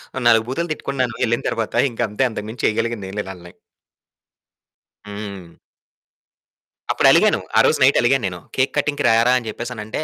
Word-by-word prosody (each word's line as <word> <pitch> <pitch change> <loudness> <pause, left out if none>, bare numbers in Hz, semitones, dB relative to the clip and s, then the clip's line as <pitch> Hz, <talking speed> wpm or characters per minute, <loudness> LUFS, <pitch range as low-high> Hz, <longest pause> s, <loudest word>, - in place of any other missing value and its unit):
ఓ - - -5
నాలుగు 115 -1 +4
బూతులు 165 +7 -3
తిట్టుకున్నాను 130 -5 -3
ఎళ్ళిన 120 0 0
తర్వాత. 115 -2 -3 0.2
ఇంక 115 - -15
అంతే 105 +6 -1
అంతకు 110 -2 -6
మించి 110 +1 -8
చేయగలిగిందేం 105 -3 -3
లేదు 95 - -5
ఆళ్ళని. 90 -1 -14 1.5
హ్మ్. 100 -4 -8 1.4
అప్పుడలిగాను. - - +4 0.2
ఆ - - +7
రోజు - - +3
నైట్ 135 +2 +5
అలిగాను 130 +1 +2
నేను. 90 -1 -6 0.2
"కేక్ 130 +1 +1
కటింగ్‌కి 145 0 0
రారా" 115 +2 +4
అని 120 -3 -5
చెప్పేసనంటే, 115 +3 -5
115 Hz, 150 wpm, -20 LUFS, 105-130 Hz, 1.5 s, ఆ